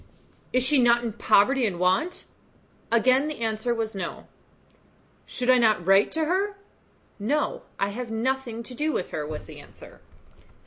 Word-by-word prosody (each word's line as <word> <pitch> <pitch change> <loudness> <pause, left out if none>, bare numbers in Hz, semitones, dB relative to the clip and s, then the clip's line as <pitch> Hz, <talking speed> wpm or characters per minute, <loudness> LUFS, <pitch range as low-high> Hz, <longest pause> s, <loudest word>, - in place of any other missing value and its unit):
"Is 255 0 +2
she 270 +2 +3
not 240 0 +4
in 230 -3 -3
poverty 235 +4 +3
and 185 -4 -4
want?" 185 - 0 0.7
Again 255 +5 +3
the 305 -4 -6
answer 220 +1 -1
was 225 -2 -2
"No." 190 - -6 1.0
"Should 250 - -4
not 220 -2 +4
I - - -12
write 195 +3 +4
to 320 -1 0
her?" 390 +4 -1 0.6
"No; 280 +9 -1 0.2
have 210 +5 -3
nothing 235 0 -2
to 250 - -9
do 300 +5 -1
with 185 - -3
her," 150 -1 -4
was 155 0 -6
the - - -11
answer. - - -15
235 Hz, 160 wpm, -25 LUFS, 210-265 Hz, 1.0 s, not